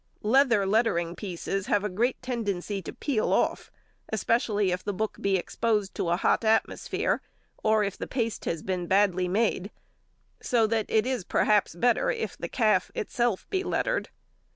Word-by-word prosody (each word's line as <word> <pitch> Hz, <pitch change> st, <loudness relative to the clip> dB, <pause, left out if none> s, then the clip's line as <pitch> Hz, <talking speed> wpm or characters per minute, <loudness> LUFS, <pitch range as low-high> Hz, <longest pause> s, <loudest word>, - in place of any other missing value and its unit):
Leather 235 Hz, -2 st, +4 dB
lettering 190 Hz, -5 st, +1 dB
pieces 195 Hz, +1 st, -4 dB
have 205 Hz, -5 st, +2 dB
a -, -, 0 dB
great 230 Hz, +7 st, 0 dB
tendency 205 Hz, -6 st, -2 dB
to -, -, -7 dB
peel 255 Hz, -7 st, -1 dB
off, -, -, +1 dB, 0.4 s
especially 210 Hz, -2 st, +1 dB
if 180 Hz, 0 st, -2 dB
the 205 Hz, -1 st, -3 dB
book 220 Hz, +3 st, -2 dB
be 195 Hz, -1 st, +2 dB
exposed 210 Hz, +2 st, -1 dB
to 170 Hz, -, -2 dB
a 170 Hz, -, +3 dB
hot 195 Hz, -, +2 dB
atmosphere, 220 Hz, 0 st, +1 dB, 0.4 s
or 215 Hz, -1 st, +3 dB
if 200 Hz, -1 st, -3 dB
the -, -, -4 dB
paste 230 Hz, -4 st, -2 dB
has 165 Hz, -2 st, -2 dB
been 180 Hz, -2 st, -2 dB
badly 185 Hz, -2 st, +3 dB
made, 200 Hz, 0 st, 0 dB, 0.7 s
so 235 Hz, -3 st, +2 dB
that 220 Hz, 0 st, 0 dB
it 220 Hz, 0 st, +2 dB
is 255 Hz, -5 st, -1 dB
perhaps 210 Hz, -1 st, +2 dB
better 245 Hz, -, +2 dB
if 470 Hz, -2 st, -2 dB
the -, -, -6 dB
calf 215 Hz, -6 st, +2 dB
itself 235 Hz, -2 st, -1 dB
be 380 Hz, -1 st, 0 dB
lettered. -, -, -1 dB
210 Hz, 165 wpm, -27 LUFS, 190-230 Hz, 0.7 s, Leather